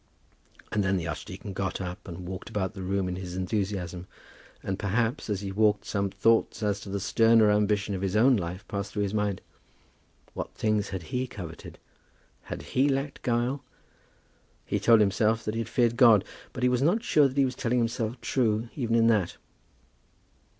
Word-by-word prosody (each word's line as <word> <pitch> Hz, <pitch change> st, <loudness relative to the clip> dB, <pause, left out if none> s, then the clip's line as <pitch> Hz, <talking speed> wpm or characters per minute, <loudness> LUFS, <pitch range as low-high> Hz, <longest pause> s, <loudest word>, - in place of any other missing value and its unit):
Then 95 Hz, -2 st, +1 dB
the 85 Hz, -2 st, -3 dB
archdeacon 95 Hz, +5 st, -6 dB
got 95 Hz, 0 st, -2 dB
up, 95 Hz, +3 st, -6 dB
and 90 Hz, 0 st, -7 dB
walked 95 Hz, 0 st, -6 dB
about 95 Hz, -1 st, -2 dB
the 95 Hz, -, -8 dB
room 95 Hz, 0 st, -1 dB
in 90 Hz, 0 st, -3 dB
his 90 Hz, -1 st, -6 dB
enthusiasm; 95 Hz, -2 st, -3 dB, 0.6 s
and, 95 Hz, 0 st, -3 dB
perhaps, 110 Hz, +4 st, -1 dB
as 100 Hz, -2 st, -1 dB
he 100 Hz, -1 st, -4 dB
walked 105 Hz, +1 st, +2 dB
some 100 Hz, -1 st, -1 dB
thoughts 110 Hz, +3 st, +2 dB
as 105 Hz, -1 st, 0 dB
to 100 Hz, -, -9 dB
the 100 Hz, +1 st, -2 dB
sterner 115 Hz, +2 st, +4 dB
ambition 105 Hz, 0 st, +1 dB
of 95 Hz, -, -3 dB
his 95 Hz, 0 st, -1 dB
own 125 Hz, +4 st, +5 dB
life 90 Hz, 0 st, -4 dB
passed 100 Hz, 0 st, -4 dB
through 105 Hz, -, 0 dB
his 100 Hz, 0 st, -2 dB
mind. 105 Hz, -2 st, -1 dB, 0.9 s
What -, -, -6 dB
things 105 Hz, -2 st, 0 dB
had 95 Hz, -3 st, -5 dB
he 130 Hz, +1 st, 0 dB
coveted? 90 Hz, -9 st, -9 dB, 0.7 s
Had -, -, -6 dB
he 135 Hz, +3 st, +3 dB
lacked 135 Hz, +1 st, -2 dB
guile? 125 Hz, +3 st, 0 dB, 1.0 s
He -, -, -1 dB
told 115 Hz, -2 st, +5 dB
himself 110 Hz, +3 st, +2 dB
that 105 Hz, -, -1 dB
he 115 Hz, -, -2 dB
had 115 Hz, -, -6 dB
feared 120 Hz, -1 st, +2 dB
God, 115 Hz, -6 st, +6 dB, 0.3 s
but 125 Hz, -, -6 dB
he 125 Hz, -, +5 dB
was 125 Hz, 0 st, +1 dB
not 180 Hz, +11 st, +2 dB
sure 150 Hz, -, +4 dB
that 135 Hz, +1 st, -8 dB
he 140 Hz, -, +5 dB
was 130 Hz, -, -2 dB
telling 125 Hz, 0 st, -1 dB
himself 115 Hz, 0 st, -1 dB
true 115 Hz, -3 st, 0 dB
even 115 Hz, -5 st, 0 dB
in 115 Hz, -1 st, +4 dB
that. 105 Hz, -6 st, +2 dB
105 Hz, 185 wpm, -27 LUFS, 95-115 Hz, 1.0 s, God